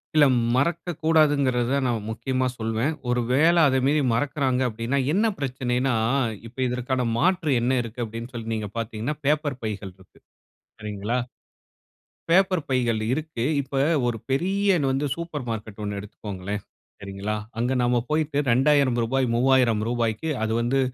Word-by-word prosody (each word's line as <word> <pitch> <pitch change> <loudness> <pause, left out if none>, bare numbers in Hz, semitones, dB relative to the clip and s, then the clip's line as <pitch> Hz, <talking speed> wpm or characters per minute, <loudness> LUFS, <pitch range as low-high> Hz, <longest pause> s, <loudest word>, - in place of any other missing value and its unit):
இல்ல 150 - +7 0.3
மறக்கக்கூடாதென்குறது 150 -5 +2
நான் 115 -4 -1
முக்கியமா 130 +3 -1
சொல்வேன். 115 +5 -1 0.2
ஒரு 125 0 +2
வேளை 165 +6 +4
அத 130 0 +2
மீறி 150 +2 +3
மறக்குறாங்க 130 0 0
அப்டீன்னா, 115 +4 -2 0.2
என்ன 215 +4 +2
பிரச்சனைனா 130 -1 -1 0.5
இப்போ 125 +3 -14
இதற்கான 125 0 -1
மாற்று 180 0 +2
என்ன 130 +2 +2
இருக்குதுனு 115 +1 -5
அப்டீன்னு, 115 +3 -7
சொல்லி 115 -1 -4
நீங்க 105 -2 -4
பாத்தீங்கன்னா, 115 +5 -3
பேப்பர் 145 -3 +1
பைகள் 100 -3 -4
இருக்கு. 95 -1 -21 0.6
சரிங்களா. 105 +3 -3 1.1
பேப்பர் 185 -1 +3
பைகள் 120 -4 +1
இருக்கு. 150 -5 -3 0.2
இப்போ 135 0 -3 0.3
ஒரு 120 -2 -1
பெரிய 195 +8 +2 0.2
வந்து 135 +2 0
சூப்பர் 165 -6 -5
மார்க்கெட் 110 -1 -5
ஒண்ணு 100 0 -3
எடுத்துக்கொள்ளுங்களேன், 100 -1 -6 0.4
சரிங்களா. 100 +2 -4 0.2
அங்க 125 +2 +1
நம்ப 120 0 +2
போயிட்டு 155 -2 0
ரூ.2000 130 -1 +3
ரூ.3000 120 -3 +2
க்கு 160 - -3
அது 110 - 0
வந்து 125 +3 +1
125 Hz, 130 wpm, -24 LUFS, 115-145 Hz, 1.1 s, இல்ல